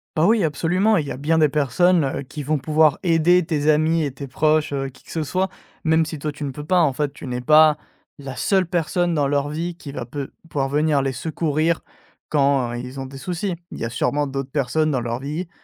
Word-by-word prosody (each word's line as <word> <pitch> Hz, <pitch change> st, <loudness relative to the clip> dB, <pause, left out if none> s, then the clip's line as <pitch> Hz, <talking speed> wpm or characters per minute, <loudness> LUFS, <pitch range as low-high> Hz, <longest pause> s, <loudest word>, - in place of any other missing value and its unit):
Bah 160 Hz, 0 st, +3 dB
oui 220 Hz, -5 st, +3 dB
absolument. 180 Hz, +8 st, +2 dB
Il 155 Hz, -, +1 dB
y -, -, -5 dB
a -, -, -5 dB
bien 155 Hz, +4 st, +1 dB
des 155 Hz, -2 st, +4 dB
personnes, 155 Hz, +4 st, +2 dB
heu, 135 Hz, +1 st, -3 dB
qui 145 Hz, +3 st, -7 dB
vont 150 Hz, +2 st, 0 dB
pouvoir 155 Hz, +1 st, +3 dB
aider 175 Hz, 0 st, +4 dB
tes 150 Hz, -1 st, 0 dB
amis 155 Hz, +2 st, +3 dB
et 140 Hz, -, -3 dB
tes 140 Hz, +1 st, -7 dB
proches, 155 Hz, +2 st, +1 dB
heu, 135 Hz, -1 st, -2 dB
qui 135 Hz, -, -14 dB
que -, -, -14 dB
ce 160 Hz, -2 st, -2 dB
soit, 185 Hz, +6 st, -1 dB, 0.3 s
même 160 Hz, 0 st, +3 dB
si 155 Hz, 0 st, -6 dB
toi 150 Hz, +1 st, -3 dB
tu 145 Hz, 0 st, -6 dB
ne 140 Hz, -, -3 dB
peux 145 Hz, +3 st, -8 dB
pas 180 Hz, +4 st, +2 dB
en 150 Hz, -6 st, +3 dB
fait, 145 Hz, 0 st, -1 dB
tu 140 Hz, -, -9 dB
n'es 125 Hz, 0 st, -3 dB
pas 155 Hz, +3 st, +6 dB, 0.4 s
la 135 Hz, -3 st, -8 dB
seule 190 Hz, -2 st, +2 dB
personne 175 Hz, +1 st, 0 dB
dans 145 Hz, -3 st, +1 dB
leur 145 Hz, +1 st, 0 dB
vie 165 Hz, +3 st, -3 dB
qui 150 Hz, -4 st, -9 dB
va 125 Hz, -, -5 dB
peut 135 Hz, +3 st, -6 dB, 0.2 s
pouvoir 135 Hz, -2 st, -1 dB
venir 150 Hz, 0 st, +2 dB
les 135 Hz, 0 st, -1 dB
secourir 160 Hz, +3 st, -1 dB, 0.5 s
quand, 140 Hz, -4 st, +2 dB
heu, -, -, -4 dB
ils 125 Hz, +2 st, -8 dB
ont -, -, -5 dB
des 135 Hz, +1 st, -9 dB
soucis. 180 Hz, +5 st, -3 dB, 0.2 s
Il -, -, -7 dB
y -, -, -4 dB
a 115 Hz, -, -2 dB
sûrement 145 Hz, +5 st, 0 dB
d'autres 135 Hz, -1 st, -4 dB
personnes 155 Hz, +3 st, +1 dB
dans 135 Hz, -4 st, 0 dB
leur 120 Hz, +1 st, -3 dB
vie, 155 Hz, +6 st, -4 dB
150 Hz, 245 wpm, -22 LUFS, 140-165 Hz, 0.5 s, pas